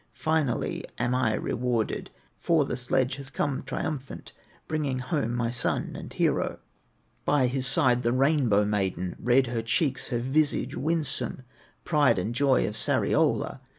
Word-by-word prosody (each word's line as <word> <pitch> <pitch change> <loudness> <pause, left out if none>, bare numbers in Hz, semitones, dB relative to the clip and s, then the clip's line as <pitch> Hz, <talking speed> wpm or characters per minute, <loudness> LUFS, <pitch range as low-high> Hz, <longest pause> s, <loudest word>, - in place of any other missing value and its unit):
Finally 155 -6 0
am 120 - 0
I 125 -4 +2
rewarded, 120 -2 -1 0.3
For 160 -4 +2
the - - -3
sledge 125 +1 0
has 140 -1 -8
come 140 -1 -1
triumphant, 135 +1 -5 0.4
Bringing 150 -4 -1
home 125 -2 -1
my 120 -1 0
son 120 0 -2
and - - -8
hero, - - 0 0.7
By 145 -3 +3
his 130 +1 0
side 125 -1 +3
the 120 -1 +1
Rainbow 130 -6 +3
maiden, 95 -3 -1
Red 125 +3 +3
her 120 -1 -2
cheeks, 130 +4 0
her 120 - -1
visage 145 +5 0
winsome, 150 -4 -1 0.4
Pride 150 - +3
and 100 +6 -2
joy 135 +1 +3
of - - -5
Sariola. - - +1
130 Hz, 145 wpm, -27 LUFS, 120-145 Hz, 0.7 s, By